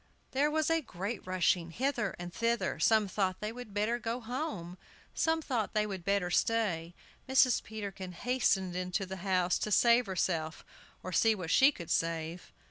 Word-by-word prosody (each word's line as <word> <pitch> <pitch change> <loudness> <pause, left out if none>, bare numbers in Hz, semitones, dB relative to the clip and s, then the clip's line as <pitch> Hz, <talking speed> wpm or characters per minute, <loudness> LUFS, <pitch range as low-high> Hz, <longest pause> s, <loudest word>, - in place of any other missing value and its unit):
There 285 +3 +2
was 315 +1 +1 0.2
great 195 +4 -5
rushing 180 -2 +1
hither 250 +1 -1
and 175 0 -7
thither. 230 0 0
Some 220 -2 +4
thought 190 -1 -1
they 210 +1 -3
would 245 -2 -9
better 215 +4 0
go 230 +1 -3
home; 225 - -5 0.3
some 320 0 +1
thought 235 -8 -2
they 210 0 +2
would 190 -4 -5
better 200 -2 0
stay. 175 -7 0 0.3
Mrs. 265 -2 +4
Peterkin 195 -4 -7
hastened 190 -5 0
into 180 +2 -2
the 190 +1 -6
house 185 -1 +1
to - - -2
save 235 +2 +5
herself, 170 -4 -2 0.4
or 185 - -5
see 225 +5 +4
what 180 -5 -4
she 270 +2 +6
could 170 - -8
save. 165 +1 -2
200 Hz, 165 wpm, -31 LUFS, 180-235 Hz, 0.4 s, she